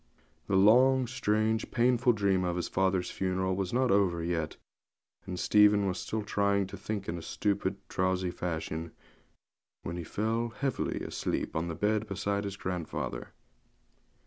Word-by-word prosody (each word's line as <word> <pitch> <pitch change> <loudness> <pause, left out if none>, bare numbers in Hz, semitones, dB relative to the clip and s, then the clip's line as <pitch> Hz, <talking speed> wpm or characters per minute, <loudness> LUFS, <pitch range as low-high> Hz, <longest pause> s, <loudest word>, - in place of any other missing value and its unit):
The 100 - +1
long, 125 +7 +6
strange, 110 -2 0
painful 120 0 +3
dream 100 -3 +1
of 90 0 -1
father's 95 -1 +1
funeral 95 0 -1
was 95 -2 -2
not 125 +1 +2
over 90 -4 +2
yet, 85 -2 -2 0.7
and 90 -1 -4
Stephen 105 -1 +5
was 95 -1 -1
still 110 -1 -3
trying 100 -1 +1
to 95 - -8
think 100 +1 -4
in 85 +1 -3
a - - -9
stupid, 100 +4 -1
drowsy 95 -1 0
fashion, 80 -1 -4 0.9
when 85 - -4
he 85 - -4
fell 115 +6 -1
heavily 135 -3 -1
asleep - - -3
on 80 +2 -1
the 85 - -4
bed 105 +3 0
beside 100 0 -2
his 100 0 -5
grandfather. 90 -4 -4
100 Hz, 145 wpm, -30 LUFS, 90-110 Hz, 0.9 s, long